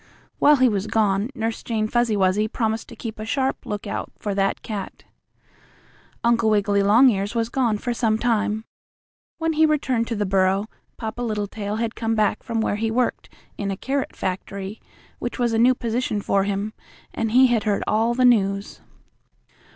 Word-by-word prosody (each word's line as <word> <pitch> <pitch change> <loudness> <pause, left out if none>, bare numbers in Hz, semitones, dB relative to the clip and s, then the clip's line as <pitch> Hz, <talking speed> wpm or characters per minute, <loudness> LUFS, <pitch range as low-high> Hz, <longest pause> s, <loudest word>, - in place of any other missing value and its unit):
While 295 +1 +6
he 260 -2 +4
was 205 -2 -1
gone, 210 0 +1
Nurse 225 -1 -2
Jane 220 -2 -1
Fuzzy 235 -2 +1
Wuzzy 195 +2 +2
promised 220 0 -2
to - - -10
keep 225 -2 -7
a - - -4
sharp 265 +4 -1
lookout 210 -1 -4
for 205 - -3
that 195 0 0
cat. 205 -4 -6 1.2
Uncle 230 -1 +3
Wiggily 205 -1 +2
Longears 205 0 +4
was 230 0 0
gone 240 -4 +1
for 240 +3 -2
some 225 -2 +1
time. 220 -2 0 0.7
When 325 0 0
he 315 +1 +3
returned 260 -6 0
to 230 - -2
the 205 -1 -1
burrow 190 +1 +2 0.3
Papa 225 +1 -5
Littletail 210 -2 -3
had 225 0 -2
come 225 -1 -1
back 215 -1 +1
from 230 -1 -2
where 205 - 0
he 225 +1 -1
worked 245 +2 -1 0.3
in 200 -2 -2
a 195 - -3
carrot 270 +4 -2
factory, 195 +2 -5 0.4
which 240 - -4
was 240 -2 +1
a 225 - +2
new 250 +2 +5
position 235 -2 -1
for 195 -1 +1
him, 200 +2 -2 0.4
and 225 -1 -1
he 260 +2 +7
had 235 -4 +1
heard 205 -2 +1
all 225 +3 +1
the 255 0 +3
news. 200 -4 +2
220 Hz, 175 wpm, -23 LUFS, 205-240 Hz, 1.2 s, he